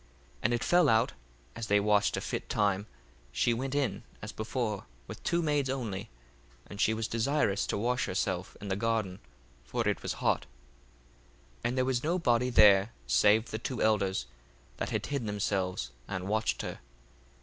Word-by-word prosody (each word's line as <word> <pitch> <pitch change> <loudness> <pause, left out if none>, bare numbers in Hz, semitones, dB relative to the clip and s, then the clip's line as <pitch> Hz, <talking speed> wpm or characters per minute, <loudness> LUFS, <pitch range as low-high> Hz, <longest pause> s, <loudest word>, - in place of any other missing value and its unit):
1:15 - - -29 0.3
And 115 - +2
it 120 - -2
fell 175 0 +4
out, 115 +1 +3 0.4
as 115 - -4
they 105 0 +4
watched 105 0 +2
a - - -2
fit - - -4
time, 100 0 +1 0.4
she 120 - +2
went 130 +4 -3
in 130 -9 0 0.2
as 105 - -6
before 110 -2 -3 0.2
with - - -9
two 170 0 +1
maids 145 -3 +1
only, 115 -8 -3 0.6
and 100 +1 -6
she 110 - +4
was 110 0 -1
desirous 115 -3 +1
to - - -1
wash 125 +4 0
herself 95 -1 -2
in 100 - -6
the 95 - +1
garden: 105 -3 -1 0.4
for - - -2
it - - 0
was - - -2
hot. - - 0 1.1
1:16 - - -29
And 120 +2 0
there 130 - +3
was 130 -1 0
no 170 +4 +1
body 125 -6 +2
there 105 -2 +6
save 105 - +4
the 110 - -3
two 125 0 -4
elders, 100 -3 +2 0.5
that - - -2
had - - -1
hid 140 -6 -2
themselves, 95 -9 -1 0.2
and 95 0 -4
watched 110 +2 0
her. - - -5
110 Hz, 180 wpm, -30 LUFS, 100-125 Hz, 1.1 s, there